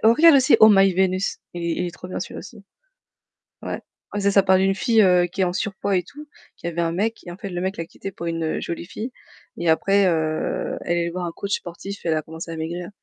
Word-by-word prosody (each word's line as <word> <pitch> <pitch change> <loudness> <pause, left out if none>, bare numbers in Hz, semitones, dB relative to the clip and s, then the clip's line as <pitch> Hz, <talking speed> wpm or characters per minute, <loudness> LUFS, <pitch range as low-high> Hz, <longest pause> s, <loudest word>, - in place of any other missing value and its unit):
oh 225 +1 +7
regarde 330 +2 +7
aussi 265 +1 +5
Oh 220 - +10
my 195 -1 +5
Vénus, 185 +1 +1 0.2
il 175 - -5
est 170 - 0
il 180 - -1
est - - -4
trop 180 - -11
bien 185 - -4
celui-là - - -6
aussi. 200 0 -11 1.0
Ouais. - - -5 0.4
C'est 200 0 +2
ça 195 0 +5
parle 190 0 +4
d'une 195 0 +2
fille, 225 +2 +3
heu, 180 -3 +5
qui 190 +3 -4
est - - +5
en 180 - +1
surpoids 200 0 -1
et 180 - -1
tout, 295 - -12 0.3
qui 170 - -7
avait 170 0 -4
un 165 0 0
mec, 220 +6 -1
en 175 - -7
fait 200 0 -7
le 175 -1 -4
mec 190 +2 -2
l'a 165 - -4
quittée 195 - -8
pour 170 -2 -6
une, 165 0 -2
heu, 155 - -2
jolie 170 0 -5
fille, 215 +6 -6 0.5
et 170 - -2
après, 195 +4 +3
heu, 160 -2 -1
elle 175 - +1
est - - +2
allée 170 - -1
voir 180 +1 -4
un 170 - -3
coach 200 +3 -6
sportif 195 +3 -8
et - - 0
elle 160 - +3
a 155 - 0
commencé 160 +2 -9
à 165 - -5
maigrir. 170 +2 -4
185 Hz, 265 wpm, -23 LUFS, 170-200 Hz, 1.0 s, Oh